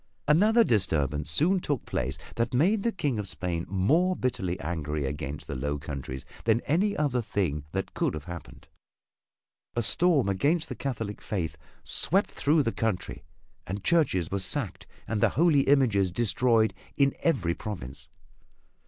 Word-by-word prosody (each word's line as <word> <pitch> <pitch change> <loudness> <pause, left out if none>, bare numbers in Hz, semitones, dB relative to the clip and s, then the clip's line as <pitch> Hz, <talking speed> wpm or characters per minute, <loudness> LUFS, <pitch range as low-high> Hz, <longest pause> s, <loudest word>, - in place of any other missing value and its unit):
Another 210 +10 +5
disturbance 75 - 0
soon 175 - +2
took 145 -7 -2
place 65 +2 -2 0.2
that 115 +2 -1
made 195 - +3
the 235 - +1
King 145 - -1
of 105 - -3
Spain 85 -2 -3
more 155 - +2
bitterly 115 - -2
angry 75 -2 -3
against 70 +1 -4
the - - -5
Low 70 +3 -2
Countries 70 -3 -6 0.2
than 115 0 +4
any 200 +7 +1
other 140 -5 +1
thing 85 -10 -2
that - - -3
could - - 0
have 75 - -6
happened. 85 -1 -9 1.1
A 120 - +1
storm 160 - +3
against 150 - +1
the - - -4
Catholic 115 -6 -4
faith 90 -7 -3 0.3
swept 195 +4 +2
through 150 +1 +2
the 115 - 0
country 105 -10 -3 0.4
and 100 +2 -4
churches 135 - +2
were 100 - 0
sacked 115 +1 0 0.2
and 110 -2 -1
the - - +5
holy 155 -1 +4
images 115 -9 +4
destroyed 115 +1 +2 0.2
in 140 -1 +3
every 90 - +1
province. 85 - -7
110 Hz, 155 wpm, -28 LUFS, -, 1.1 s, Another